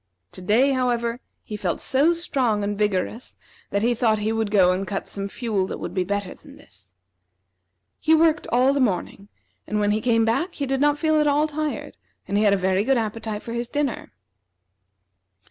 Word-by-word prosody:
To - - -11
day, 230 +9 +3
however, 240 -2 0 0.2
he 215 - -7
felt 190 -4 -2
so 280 +5 +3
strong 255 -11 0
and 205 0 -2
vigorous 210 +3 -2 0.3
that 200 +1 -1
he 240 +1 +3
thought 225 -2 +2
he 210 +1 -1
would 225 -1 -1
go 190 -3 +4
and 185 +1 -2
cut 195 - -4
some 200 0 -5
fuel 210 -5 -2
that - - -5
would - - -6
be 185 - 0
better 200 0 -3
than - - -16
this. 90 - -13 1.0
He 320 0 +4
worked 320 0 +2
all 255 +3 +3
the 280 - 0
morning, 200 -4 -1 0.4
and 210 - -1
when 205 0 +2
he 215 +1 0
came 230 -1 +2
back 280 - -1
he 285 - -2
did 270 0 -1
not 295 0 +3
feel 315 0 +2
at 300 - +2
all 295 +2 +2
tired, 305 0 -4 0.3
and 200 - -2
he 210 - +3
had 205 - +4
a - - +2
very 190 +1 +1
good 265 +3 +2
appetite 220 -1 -3
for 230 - -6
his 235 0 -3
dinner. 290 -4 -2
225 Hz, 200 wpm, -23 LUFS, 205-270 Hz, 1.0 s, go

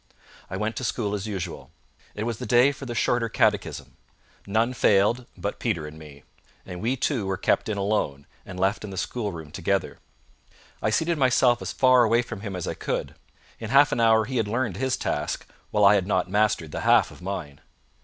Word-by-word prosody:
I 95 - -4
went 105 +2 -2
to - - -3
school 105 -4 -1
as 105 0 -3
usual. 95 -5 -5 0.5
It 105 - -3
was 115 -1 -3
the - - -5
day 120 +5 +5
for 135 -1 -9
the 120 - -5
Shorter 115 0 +1
Catechism. - - 0 0.5
None 115 +5 +1
failed 115 +2 +2
but - - -4
Peter 80 -2 -1
and 75 +1 -10
me; 75 -2 -13 0.4
and 90 -1 -7
we 120 +4 0
two 125 -5 -1
were 95 -1 -1
kept - - +1
in 105 - -2
alone, 100 -9 -1 0.2
and 90 - -9
left 95 +3 +1
in 105 - -6
the 95 - -8
schoolroom 85 -10 -4
together. 95 +3 -2 0.8
I - - +1
seated 160 +8 0
myself 125 -2 +3
as - - -4
far 125 -3 +4
from 110 -4 -8
him 100 -3 -5
as 90 - -4
I - - -2
could. - - -3 0.5
In 110 - -6
half 140 +3 +5
an 120 - 0
hour 110 -1 +4
he 130 +2 -3
had 110 -3 +1
learned 115 -3 -1
his 130 0 0
task, - - -2 0.2
while 105 -1 +3
I 100 - +8
had 95 -3 +1
not 90 -3 +1
mastered 100 -5 +1
the - - -4
half - - +4
of - - -14
mine. 85 -7 -6
105 Hz, 205 wpm, -25 LUFS, 95-120 Hz, 0.8 s, I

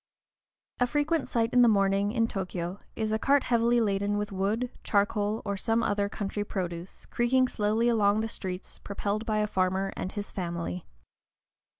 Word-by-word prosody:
A 245 - +3
frequent 295 +3 0
sight 230 -1 0
in 250 - +6
the 240 - +7
morning, 200 -1 +3
in 230 -1 +2
Tōkyō, 185 -2 -4 0.2
is 220 -1 -1
a 220 - +1
cart 280 +3 +3
heavily 235 0 +3
laden 205 -1 +1
with 205 0 -2
wood, 210 +6 -1
charcoal, 205 +1 +1
or 200 - -1
some 225 +4 +1
other 205 -1 +1
country 205 0 -3
produce, 180 -3 -5
creaking 255 +2 +2
slowly 220 0 +1
along 215 -2 +3
the 225 - -1
streets, 185 -4 -6
propelled 205 +2 -3
by 215 -1 +1
a 210 - +2
farmer 190 -1 0
and 185 - -4
his 205 -2 -5
family. 175 -1 -4
210 Hz, 170 wpm, -28 LUFS, 195-230 Hz, 0.2 s, the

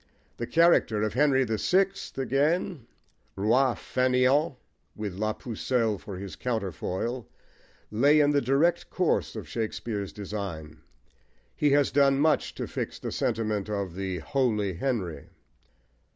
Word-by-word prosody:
The 120 - -4
character 165 -11 +4
of 110 - -1
Henry 135 +1 +3
the 110 -3 -2
Sixth 195 -2 +1
again, 140 - 0 0.5
roi 120 +6 +3
fainéant, 130 +3 +2 0.4
with 105 -3 -4
La 110 +3 -1
Pucelle* 115 -3 -1
for 100 -4 -8
his 95 -3 -7
counterfoil, 110 +1 -3 0.6
lay 140 +8 +4
in 145 -1 +4
the 145 -1 +3
direct 140 +7 +2
course 180 -9 0
of 105 -8 -6
Shakespeare's 110 0 -3
design: 90 -7 -6 0.7
he 150 - +2
has 145 -1 +3
done 140 -1 +4
much 155 +1 +2
to - - -3
fix - - -4
the - - -5
sentiment 105 -2 -1
of 100 -4 -3
the 95 0 -3
"holy 105 - 0
Henry." 95 - -3
115 Hz, 130 wpm, -27 LUFS, 100-140 Hz, 0.7 s, character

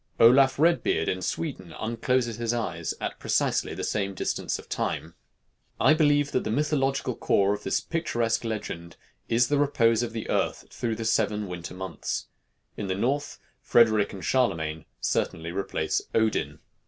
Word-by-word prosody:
Olaf 130 +3 +6
Redbeard 170 +3 +2
in 95 - -1
Sweden 95 - -4
uncloses 115 +1 0
his 120 0 -1
eyes 85 -8 -3
at - - -4
precisely - - 0
the - - -5
same 100 -2 -1
distances - - -2
of - - -12
time. 80 +2 -3 0.7
I - - +6
believe 145 -2 +3
that - - 0
the - - -3
mythological 135 0 0
core 100 -1 +2
of 105 - -5
this - - 0
picturesque 120 -10 -1
legend 95 -7 -5 0.3
is 120 +1 +3
the 145 +1 +1
repose 120 -6 +3
of 120 -1 -2
the 115 - -4
earth - - -1
through 115 -2 -2
the 115 - -5
seven 105 -1 +1
winter 90 0 -6
months. 95 -4 -4 0.5
In 100 - -4
the 95 - -1
North, 140 +8 -1 0.2
Frederic 110 -6 +4
and 95 -2 -7
Charlemagne 80 - 0
certainly 80 +6 -1
replace 95 +2 -1
Odin. 110 -1 +1
115 Hz, 155 wpm, -27 LUFS, 95-130 Hz, 0.7 s, Olaf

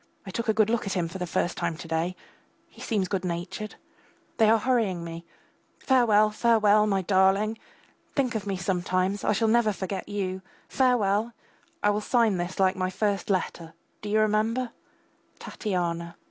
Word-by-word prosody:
I 190 - -7
took 230 +4 -3
a - - +4
good 215 0 +3
look 235 -3 0
at 195 - -1
him 175 -3 0
for 190 +3 -8
the 180 - -3
first 175 +1 -1
time 165 - -2
to 165 - -9
day. 165 +3 -1 0.6
He - - -15
seems 205 -5 -1
good 195 -2 -2
natured. 180 +4 -4 0.6
They 220 -2 +5
are 225 - +6
hurrying 220 -8 0
me. 165 0 -7 0.5
Farewell, 215 -5 +3
farewell.... 215 -1 +4
My 195 -2 +1
darling!! 195 +4 +2 0.6
Think 260 -4 +1
of 210 -3 -4
me 195 -1 -1
sometimes; 185 +1 -1
I - - +2
shall 225 +2 +1
never 225 -1 +3
forget 195 0 -5
you. 190 -2 -3 0.3
Farewell! 230 -3 +1 0.5
I 205 0 +3
sign 225 -2 +2
this 175 +1 -3
last - - -12
like 190 0 +3
my 185 0 -1
first 200 +2 -1
letter, 170 -4 -2 0.3
do 210 - -6
you 215 +1 +2
remember? 220 +3 +1 0.7
TATYANA. 170 -4 -3
205 Hz, 175 wpm, -26 LUFS, 185-220 Hz, 0.7 s, are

